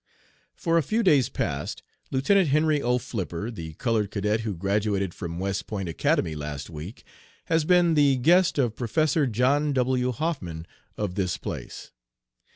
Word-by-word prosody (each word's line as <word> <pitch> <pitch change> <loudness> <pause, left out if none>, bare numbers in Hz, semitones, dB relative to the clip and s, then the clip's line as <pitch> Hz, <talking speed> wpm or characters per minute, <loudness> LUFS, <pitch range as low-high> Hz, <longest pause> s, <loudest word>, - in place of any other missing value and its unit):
"For 165 -1 +2
a - - +2
few 220 +8 0
days 145 - +4
past 70 +1 -3 0.3
Lieutenant 170 +8 +3
Henry 150 +1 +2
O. 125 0 +2
Flipper, 110 -4 -4
the 80 -7 -7
colored 110 -3 0
cadet 105 +1 0
who 110 -3 -3
graduated 100 0 0
from 85 -1 -6
West 95 +1 -2
Point 100 -4 -4
Academy 80 0 0
last 75 -1 -6
week, 80 +7 -8 0.4
has 160 -2 +1
been 175 -1 +4
the 145 -3 +4
guest 170 +9 +4
of 120 -5 +1
Professor 150 +5 +1
John 135 +6 +2
W. 125 -1 +1
Hoffman, 110 - -3 0.3
of 105 -4 -2
this 90 -2 -1
place. - - -7
120 Hz, 155 wpm, -26 LUFS, 95-150 Hz, 0.4 s, days